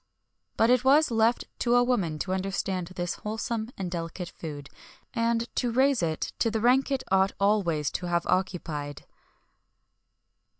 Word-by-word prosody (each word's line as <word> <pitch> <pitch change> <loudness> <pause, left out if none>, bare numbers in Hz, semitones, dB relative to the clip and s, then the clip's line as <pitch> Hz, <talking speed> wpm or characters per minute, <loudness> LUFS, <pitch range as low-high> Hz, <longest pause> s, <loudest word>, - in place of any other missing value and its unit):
But 225 +2 +4
it 250 -1 +4
was 285 +2 +5
left 225 +1 +2
to 240 0 +2
a 245 - +5
woman 195 -11 0
to 185 - -2
understand 190 -1 -2
this 175 -1 -3
wholesome 220 +1 -3
and 185 -3 -4
delicate 170 +1 -4
food, 145 -3 -8 0.5
and 230 -1 +1
to 245 -2 +1
raise 265 0 +3
it 160 -2 -2
to 230 - +2
the 220 0 -1
rank 250 +5 +3
it 270 -2 -1
ought 190 +1 +3
always 180 -8 +1
to 180 - -4
have 170 0 0
occupied. 165 -6 -2
195 Hz, 155 wpm, -27 LUFS, 175-235 Hz, 0.5 s, was